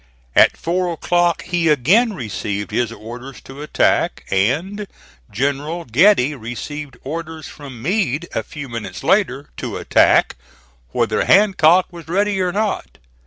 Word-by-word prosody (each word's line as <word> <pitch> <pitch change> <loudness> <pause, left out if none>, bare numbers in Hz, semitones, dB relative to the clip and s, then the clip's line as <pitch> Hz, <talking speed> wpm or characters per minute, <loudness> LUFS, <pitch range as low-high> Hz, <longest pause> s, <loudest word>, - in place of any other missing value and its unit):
At - - +5
four 175 +1 -1
o'clock 175 +1 +1
he 175 -2 0
again 185 - +3
received 105 - -4
his 120 -2 0
orders 120 +5 -9
to 135 +2 -11
attack, 150 - +1
and 160 - 0 0.4
General 145 +8 -2
Getty 150 - +4
received 135 +3 -7
orders 160 +2 -6
from 135 -6 -11
Meade 170 - 0
a - - 0
few 145 +6 -8
minutes 115 -6 -7
later 145 -9 +1
to - - -4
attack - - +3 0.5
whether - - 0
Hancock 185 -3 +5
was 170 -2 -11
ready 195 +3 0
or 180 -1 0
not. 210 +2 -2
150 Hz, 130 wpm, -19 LUFS, 125-180 Hz, 0.5 s, At